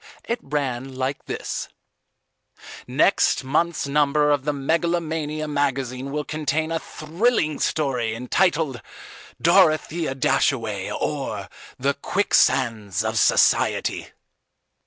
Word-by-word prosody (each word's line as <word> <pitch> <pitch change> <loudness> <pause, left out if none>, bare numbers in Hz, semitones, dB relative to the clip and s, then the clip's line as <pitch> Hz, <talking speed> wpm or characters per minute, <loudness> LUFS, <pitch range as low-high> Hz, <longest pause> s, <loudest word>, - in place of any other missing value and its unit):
It 235 +1 -2
ran 135 -2 -3
like 130 +2 -3
this: - - -4 1.2
NEXT - - +2
MONTH'S 155 +4 0
NUMBER 150 +1 +2
OF 140 -2 0
THE 150 - +1
MEGALOMANIA 160 +1 -1
MAGAZINE 135 -2 -2
WILL 150 +1 -2
CONTAIN 155 +1 -2
A 165 - 0
THRILLING 160 0 -1
STORY, 125 -7 0
ENTITLED 140 - 0 0.6
"_DOROTHEA 155 -2 +3
DASHAWAY, 110 -8 0
OR, - - -3 0.3
THE 140 +2 +1
QUICKSANDS 120 - +1
OF - - 0
SOCIETY. - - +2
145 Hz, 95 wpm, -23 LUFS, 130-155 Hz, 1.2 s, DOROTHEA